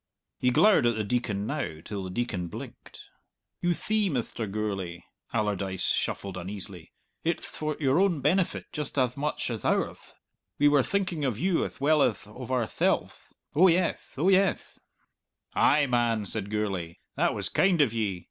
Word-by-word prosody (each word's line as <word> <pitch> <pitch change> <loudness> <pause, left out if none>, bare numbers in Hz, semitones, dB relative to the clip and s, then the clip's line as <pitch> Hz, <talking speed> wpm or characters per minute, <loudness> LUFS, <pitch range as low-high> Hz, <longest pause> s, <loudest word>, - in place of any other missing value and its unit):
He 125 - +3
glowered 185 - +5
at 120 - +2
the 110 - -1
Deacon 105 -2 -1
now 130 - -3
till 100 -2 -4
the 95 - -5
Deacon 90 -3 -2
blinked. - - -10 0.6
"You 175 -1 +2
thee, 215 +1 0
Mr. 120 - -3
Gourlay," 95 -5 -3 0.3
Allardyce 100 -3 0
shuffled 95 -2 -2
uneasily, 90 -2 -7 0.3
"it'th 170 +1 -1
for 155 -1 -4
your 140 +1 +3
own 190 -5 +3
benefit 170 +7 +1
just 150 -2 -5
ath 125 -2 +2
much 145 -3 -2
ath 115 - -4
ourth. - - -1 0.4
We 145 - +5
were 145 -1 +5
thinking 185 -1 -1
of 125 -6 0
you 180 +4 +1
ath - - -6
well 150 +2 +4
ath 110 -5 +1
of 125 +4 -9
ourthelves! 125 -4 -1 0.2
Oh 175 +6 +6
yeth, 175 0 +1
oh 170 +7 +3
yeth!" 195 0 +2 0.7
"Ay, 145 0 +4
man!" 120 -4 +1
said 100 0 -4
Gourlay, 95 -6 -2 0.2
"that - - +1
was - - -1
kind 180 -3 +3
of 135 -7 +4
ye! 105 -5 -1
125 Hz, 165 wpm, -28 LUFS, 105-155 Hz, 0.7 s, Oh